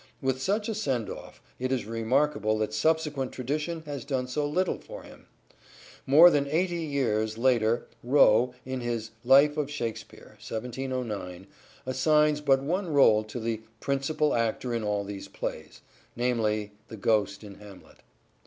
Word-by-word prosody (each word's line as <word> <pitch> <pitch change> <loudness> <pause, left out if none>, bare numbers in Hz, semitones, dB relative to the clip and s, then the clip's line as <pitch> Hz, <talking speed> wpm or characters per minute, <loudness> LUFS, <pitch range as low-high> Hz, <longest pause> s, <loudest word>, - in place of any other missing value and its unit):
With 130 -1 -1
such 205 +8 0
a 225 - -1
send 135 - -2
off, - - -11 0.2
it 130 +1 -2
is 130 -5 -1
remarkable 115 0 0
that 110 0 -2
subsequent 150 +1 0
tradition 150 +6 -3
has 145 -4 -5
done 130 -2 -2
so 145 +3 -1
little 180 +5 0
for - - -10
him. - - -15 0.8
More 160 +6 +8
than 140 -2 +1
eighty 170 +3 0
years 110 -7 -1
later 115 -2 +2 0.2
Rowe 125 -1 +4
in 130 0 -4
his 115 -2 -3
Life 140 +4 +5
of 145 -2 -1
Shakspere 120 -6 -6
(1709) 115 -6 -5 0.4
assigns 150 +3 +2
but 135 -2 +3
one 175 +4 -2
role 110 -7 +5
to 110 +3 -6
the 115 -1 -3
" 110 - -37
principall 145 +2 +1
actor 115 +1 -1
in 115 -1 -2
all 105 -1 -1
these 100 -1 -7
plays - - -6 0.2
": - - -30
namely 110 -4 0 0.2
the 110 - -9
Ghost 105 -1 0
in 100 -2 -11
Hamlet. 100 -2 -14
130 Hz, 155 wpm, -27 LUFS, 110-145 Hz, 0.8 s, More